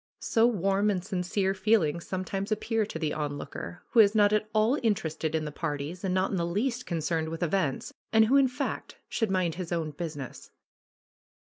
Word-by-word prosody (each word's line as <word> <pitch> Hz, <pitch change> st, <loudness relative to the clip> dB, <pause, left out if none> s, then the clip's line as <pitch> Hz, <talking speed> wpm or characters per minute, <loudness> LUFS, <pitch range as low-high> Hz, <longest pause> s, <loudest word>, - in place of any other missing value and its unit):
So 230 Hz, 0 st, +3 dB
warm 200 Hz, -2 st, +1 dB
and 185 Hz, -3 st, -1 dB
sincere 190 Hz, 0 st, 0 dB
feelings 190 Hz, -5 st, +1 dB
some 185 Hz, 0 st, -3 dB
times 195 Hz, +2 st, -3 dB
appear 220 Hz, 0 st, 0 dB
to 190 Hz, -, -5 dB
the 155 Hz, -2 st, -1 dB
onlooker, 150 Hz, +3 st, -5 dB
who 235 Hz, -, +4 dB
is 210 Hz, 0 st, +6 dB
not 205 Hz, -1 st, +5 dB
at 215 Hz, 0 st, +1 dB
all 215 Hz, +3 st, +3 dB
inter 220 Hz, -, +1 dB
ested 160 Hz, 0 st, -3 dB
in 155 Hz, -1 st, 0 dB
the 150 Hz, -, -4 dB
parties 150 Hz, +2 st, -4 dB
and 190 Hz, -, 0 dB
not 185 Hz, +1 st, +1 dB
in 195 Hz, -, 0 dB
the 170 Hz, -, 0 dB
least 235 Hz, +7 st, -1 dB
concerned 160 Hz, -1 st, -1 dB
with 165 Hz, +2 st, -3 dB
events, 170 Hz, -5 st, -1 dB, 0.2 s
and 220 Hz, 0 st, +6 dB
who, 250 Hz, +5 st, +3 dB
in 275 Hz, -1 st, +6 dB
fact, 265 Hz, +3 st, -4 dB
should 225 Hz, -3 st, 0 dB
mind 185 Hz, -3 st, +1 dB
his 175 Hz, -, -6 dB
own 165 Hz, -3 st, -1 dB
business. 145 Hz, -4 st, -7 dB
190 Hz, 200 wpm, -28 LUFS, 165-215 Hz, 0.2 s, is